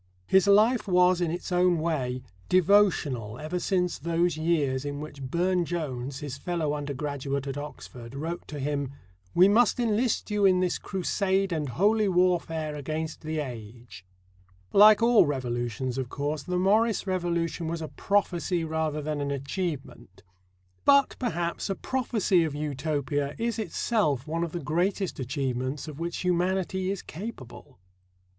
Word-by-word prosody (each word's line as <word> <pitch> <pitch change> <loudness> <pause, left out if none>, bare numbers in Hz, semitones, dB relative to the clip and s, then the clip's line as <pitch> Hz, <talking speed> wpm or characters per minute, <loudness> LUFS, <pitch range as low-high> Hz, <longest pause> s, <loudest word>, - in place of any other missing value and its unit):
His 190 - +4
life 215 +4 +4
was, 180 -1 +4
in 175 - +1
its 175 +3 -5
own 180 -1 +3
way, 135 -6 -2 0.3
devotional 170 - +3
ever 155 +6 -3
since 180 -1 0
those 170 +2 +1
years 150 -5 0
in 145 0 -4
which 150 -2 -8
Burne 175 +7 +1
Jones, 140 -5 -4
his 140 -2 -6
fellow 165 -5 -1
undergraduate 140 -1 -3
at 135 -1 -4
Oxford, 130 -4 -8
wrote 165 +5 -5
to 150 - -7
him: 140 -1 -2 0.4
"We 180 +2 +7
must 225 +3 +4
enlist 230 -1 0
you 210 -1 +1
in 185 -2 +5
this 180 -1 0
Crusade 190 0 0
and 155 -4 -2
Holy 210 - +2
Warfare 170 -4 +1
against 155 +2 -4
the 155 0 -4
age." 115 - -7 0.7
Like 210 +2 +7
all 230 -8 +6
revolutions, 125 -2 -2
of 130 -2 -3
course, 145 +2 -3
the 180 +5 -2
Morris 210 +5 +2
revolution 170 -3 -1
was 165 +1 -3
a - - -4
prophecy 180 -2 0
rather 155 -1 -2
than 150 -1 -2
an 140 - -2
achievement. 140 +2 -5 0.6
But, 280 -1 +5
perhaps, 175 -7 -2
a 195 - 0
prophecy 220 -7 +1
of 155 -3 -3
Utopia 145 -1 -2
is 230 0 -2
itself 205 - 0
one 165 +2 -2
of 170 - -3
the 175 - -4
greatest 175 +6 -1
achievements 130 +2 -2
of 150 -1 -8
which 170 +2 -3
humanity 185 +1 0
is 195 -1 -3
capable. 155 - -9
165 Hz, 150 wpm, -27 LUFS, 140-185 Hz, 0.7 s, We